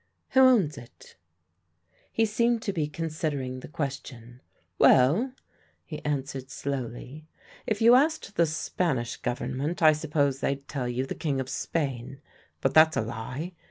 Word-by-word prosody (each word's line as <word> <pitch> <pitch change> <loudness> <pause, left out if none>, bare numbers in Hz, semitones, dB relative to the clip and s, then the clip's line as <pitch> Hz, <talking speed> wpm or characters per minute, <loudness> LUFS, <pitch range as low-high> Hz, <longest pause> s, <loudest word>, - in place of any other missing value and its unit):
"Who 265 - +3
owns 225 - +4
it?" 120 - -16 1.0
He 225 - +2
seemed 235 +1 +1
to 200 - -2
be 155 -5 -1
considering 150 -4 -3
the - - -9
question. 130 -5 -6 0.4
"Well," 170 - +5 0.5
he 155 - -8
answered 135 -2 -3
slowly, 135 +2 -5 0.4
"if 215 0 0
you 235 +2 +8
asked 280 -6 +2
the 170 - +3
Spanish 150 -5 -2
Government 130 +7 -3
I 155 -1 +8
suppose 145 -3 0
they'd 140 0 -2
tell 130 -4 -3
you 125 +2 -1
the - - -4
King 140 -4 -2
of 130 -1 -4
Spain; 135 -4 -3 0.4
but - - +1
that's 155 0 +6
a - - +2
lie. 120 +9 -5
145 Hz, 145 wpm, -27 LUFS, 130-165 Hz, 1.0 s, you